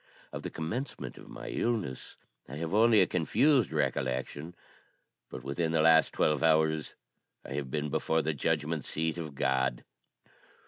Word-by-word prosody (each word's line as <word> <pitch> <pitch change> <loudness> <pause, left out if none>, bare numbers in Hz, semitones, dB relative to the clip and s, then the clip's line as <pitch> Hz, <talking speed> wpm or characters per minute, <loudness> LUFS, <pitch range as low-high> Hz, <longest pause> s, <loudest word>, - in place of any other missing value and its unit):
Of - - -5
the - - -5
commencement 110 - -5
of - - -13
my - - -8
illness 110 - -2 0.3
I 70 - -7
have 80 +3 -4
only 110 +1 +6
a - - +5
confused 125 - +2
recollection; 65 +6 -2 0.7
but 65 - -8
within 80 +5 -1
the 80 - +3
last 80 0 +5
twelve 75 -2 +1
hours 80 -1 +2 0.5
I - - -6
have 70 -1 -3
been 75 +1 -2
before 80 +3 +1
the 80 +1 0
judgment 75 +1 -1
seat 80 +4 -2
of 80 -4 -6
God. 65 -2 0
80 Hz, 150 wpm, -30 LUFS, 70-85 Hz, 0.7 s, only